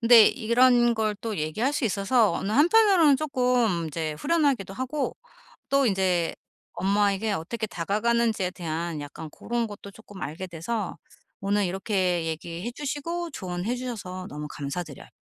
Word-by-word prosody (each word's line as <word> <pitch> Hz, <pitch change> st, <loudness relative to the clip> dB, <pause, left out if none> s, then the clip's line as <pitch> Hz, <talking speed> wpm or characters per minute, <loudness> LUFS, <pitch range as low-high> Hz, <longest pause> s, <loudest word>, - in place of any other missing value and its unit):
근데 230 Hz, -2 st, +8 dB
이런 240 Hz, 0 st, +4 dB
걸 215 Hz, -1 st, 0 dB
또 220 Hz, -3 st, -3 dB
얘기할 160 Hz, -, 0 dB
수 285 Hz, -, -1 dB
있어서 210 Hz, +2 st, +2 dB
어느 200 Hz, -, -2 dB
한편으로는 340 Hz, -, +5 dB
쪼끔 250 Hz, -, +1 dB
인제 155 Hz, 0 st, -3 dB
후련하기도 280 Hz, -, +1 dB
하고 265 Hz, +4 st, -3 dB, 0.5 s
또 275 Hz, -1 st, +3 dB
인제 185 Hz, -4 st, +1 dB, 0.4 s
엄마에게 200 Hz, +2 st, +1 dB
어떻게 220 Hz, +6 st, -3 dB
다가가는지에 215 Hz, +2 st, 0 dB
대한 170 Hz, -2 st, -4 dB
약간 145 Hz, +2 st, -8 dB
고런 235 Hz, +8 st, -2 dB
것도 205 Hz, -1 st, -10 dB
쪼끔 205 Hz, -2 st, -13 dB
알게 165 Hz, +6 st, -5 dB
돼서 180 Hz, +5 st, -4 dB, 0.4 s
오늘 200 Hz, 0 st, +1 dB
요렇게 185 Hz, -2 st, 0 dB
얘기해 170 Hz, +6 st, -4 dB
주시고 300 Hz, +5 st, -4 dB
조언해 185 Hz, +3 st, -3 dB
주셔서 205 Hz, -7 st, -6 dB
너무 150 Hz, +1 st, -6 dB
감사드려 145 Hz, +1 st, -6 dB
210 Hz, 330 characters per minute, -26 LUFS, 180-245 Hz, 0.5 s, 근데